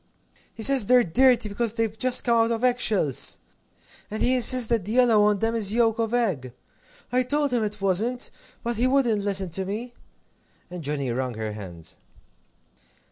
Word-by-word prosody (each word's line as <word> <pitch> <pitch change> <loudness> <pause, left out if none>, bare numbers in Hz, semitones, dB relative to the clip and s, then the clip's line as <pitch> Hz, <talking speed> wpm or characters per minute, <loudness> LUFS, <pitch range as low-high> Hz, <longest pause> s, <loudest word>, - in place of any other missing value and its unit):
"He 220 - -4
says 265 -4 +5
they're 250 -1 +5
dirty, 245 +4 +2
because 215 +2 -1
they've 225 -2 -2
just 250 +2 +3
come 235 -1 +1
out 230 0 +2
of 230 +1 -3
egg 245 -1 +2
shells! 190 - 0 0.7
And 215 - -3
he 255 +1 +4
insists 255 0 +4
that 230 -4 0
the 210 +4 -5
yellow 240 -4 +4
on 210 0 +2
them 225 +3 -1
is 215 -3 +1
yolk 230 -1 +1
of 225 -1 -1
egg. 185 - -2 0.6
I 250 +1 +2
told 285 +2 0
him 235 -3 +1
it 210 0 -5
wasn't, 215 +6 -1 0.3
but 235 -2 -3
he 245 +3 +2
wouldn't 245 -6 +1
listen 195 -3 -2
to 190 +4 -3
me." 220 +6 -6 0.8
And 180 -1 -7
Johnnie 140 -3 -3
wrung 125 0 -4
her 110 -1 -5
hands. 90 -6 -10
225 Hz, 185 wpm, -24 LUFS, 195-245 Hz, 0.8 s, says